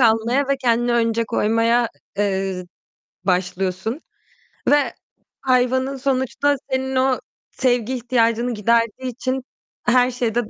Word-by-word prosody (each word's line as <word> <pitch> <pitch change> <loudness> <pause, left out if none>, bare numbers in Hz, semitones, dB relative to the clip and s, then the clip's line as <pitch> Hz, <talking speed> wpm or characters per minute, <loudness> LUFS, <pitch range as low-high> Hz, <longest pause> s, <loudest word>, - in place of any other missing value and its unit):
almaya 235 +4 +3
ve 275 - +2
kendini 240 -2 +1
önce 230 -1 +2
koymaya, 230 +3 +2
ı - - -2 0.3
eee, 190 -2 -1 0.6
başlıyorsun 185 - -1 0.7
ve 290 0 +3 0.5
hayvanın 260 +1 +2
sonuçta 270 +2 +1 0.2
senin 265 0 -1
o 260 0 +2 0.3
sevgi 245 -1 +1
ihtiyacını 235 -1 +1
giderdiği 230 +4 +1
için 260 +1 -3 0.4
her 250 +1 +4
şeyde 240 -2 -1
240 Hz, 110 wpm, -21 LUFS, 225-260 Hz, 0.7 s, her